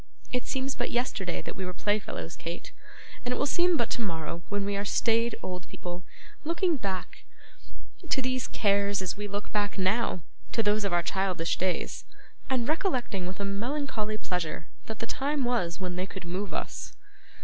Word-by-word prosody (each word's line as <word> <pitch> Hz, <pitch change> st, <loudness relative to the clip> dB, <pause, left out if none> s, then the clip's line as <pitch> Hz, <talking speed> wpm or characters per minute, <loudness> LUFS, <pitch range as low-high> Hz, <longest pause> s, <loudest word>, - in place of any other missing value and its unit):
It 250 Hz, -1 st, +1 dB
seems 265 Hz, 0 st, 0 dB
but 240 Hz, -, 0 dB
yesterday 215 Hz, -7 st, 0 dB
that -, -, -5 dB
we 190 Hz, -, -3 dB
were 180 Hz, -1 st, -3 dB
playfellows, 200 Hz, -, 0 dB
Kate, 170 Hz, +1 st, -5 dB, 0.5 s
and 245 Hz, -, 0 dB
it 250 Hz, -, +1 dB
will -, -, +3 dB
seem 345 Hz, +3 st, +4 dB
but 235 Hz, -3 st, +1 dB
tomorrow 170 Hz, -7 st, -1 dB
when 205 Hz, -1 st, +1 dB
we 200 Hz, 0 st, 0 dB
are 200 Hz, -, +1 dB
staid 230 Hz, +3 st, +3 dB
old 180 Hz, -1 st, -3 dB
people, 175 Hz, 0 st, -5 dB, 0.4 s
looking 335 Hz, +2 st, +3 dB
back 195 Hz, -7 st, -3 dB, 0.9 s
to -, -, +4 dB
these 255 Hz, -1 st, +1 dB
cares 200 Hz, -1 st, +3 dB
as 180 Hz, -, -1 dB
we 205 Hz, 0 st, -3 dB
look 205 Hz, +1 st, -3 dB
back, 205 Hz, -1 st, +1 dB
now, 190 Hz, -2 st, +2 dB, 0.3 s
to 225 Hz, -, +3 dB
those 210 Hz, 0 st, +4 dB
of 200 Hz, -, +1 dB
our 175 Hz, 0 st, +4 dB
childish 185 Hz, -4 st, +1 dB
days: 185 Hz, -1 st, 0 dB, 0.5 s
and 250 Hz, -3 st, +2 dB
recollecting 250 Hz, -, +1 dB
with 185 Hz, +2 st, -5 dB
a 200 Hz, -, 0 dB
melancholy 215 Hz, +1 st, 0 dB
pleasure 175 Hz, -6 st, -1 dB, 0.2 s
that 220 Hz, -, -3 dB
the 230 Hz, -, -2 dB
time 280 Hz, +4 st, +1 dB
was, 180 Hz, -8 st, +1 dB
when 180 Hz, -1 st, -2 dB
they 185 Hz, +1 st, 0 dB
could 190 Hz, -3 st, -7 dB
move 185 Hz, +2 st, -2 dB
us. -, -, -3 dB
205 Hz, 180 wpm, -30 LUFS, 185-245 Hz, 0.9 s, seem